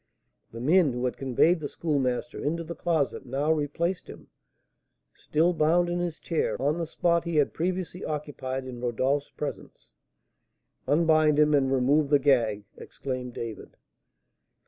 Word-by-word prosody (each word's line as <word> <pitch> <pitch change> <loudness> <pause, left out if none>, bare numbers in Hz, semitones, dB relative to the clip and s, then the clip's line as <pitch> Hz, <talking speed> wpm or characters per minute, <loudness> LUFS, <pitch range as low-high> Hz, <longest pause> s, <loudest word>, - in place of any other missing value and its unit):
The 115 - -8
men 155 +1 +4
who 125 +1 -2
had 125 - -1
conveyed 135 +6 +2
the 150 - -4
Schoolmaster 140 -2 -2
into 165 +3 -1
the 170 +1 -6
closet 165 -5 -1
now 135 +4 -1
replaced 160 +4 -1
him, - - -12 0.8
still 165 +4 +1
bound 170 +2 +2
in 175 - -1
his 175 -2 -3
chair, 165 - -2
on 145 +5 0
the 165 - -2
spot 170 +1 +1
he 170 -1 -3
had 145 -2 +2
previously 180 +1 -3
occupied 135 -3 -4
in 125 -2 -8
Rodolph's 130 +4 0
presence. 150 - -7 1.0
"Unbind 155 -1 +4
him, 150 0 +4
and 135 -2 +3
remove 140 +3 +2
the 145 - +6
gag!" 115 -7 +2
exclaimed 130 -2 -6
David. 115 -2 -7
150 Hz, 145 wpm, -27 LUFS, 130-165 Hz, 1.0 s, the